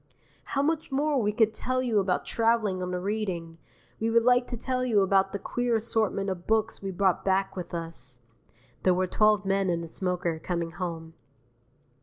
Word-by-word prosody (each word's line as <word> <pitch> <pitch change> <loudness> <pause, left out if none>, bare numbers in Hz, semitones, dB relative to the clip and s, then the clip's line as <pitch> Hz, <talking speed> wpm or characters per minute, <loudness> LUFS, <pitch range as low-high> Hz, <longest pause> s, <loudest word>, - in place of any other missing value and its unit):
How 275 - -1
much 315 0 -1
more 285 0 +1
we 210 -1 +1
could 220 0 +2
tell 255 0 -1
you 230 -4 +2
about 190 -2 0
travelling 225 -5 +1
on 180 - -3
the 180 0 -2
Reading! 180 -5 -3 0.4
We 225 - 0
would 230 0 +4
like 245 0 +4
to 245 - -5
tell 255 +2 -1
you 225 -5 +3
about 195 0 +3
the - - -2
queer 245 +3 -1
assortment 220 -3 0
of 175 -2 -7
books 220 0 +1
we 195 - -4
brought 190 -1 +1
back 195 0 +1
with 180 -2 -6
us. 165 -7 -5 0.6
(There 185 -1 +3
were 185 +1 +1
twelve 210 +1 +3
men 195 -1 +1
in 170 -1 0
the 165 - -6
smoker, 175 -2 -2
coming 170 0 -3
home.) 165 -2 -5
195 Hz, 190 wpm, -27 LUFS, 180-230 Hz, 0.6 s, would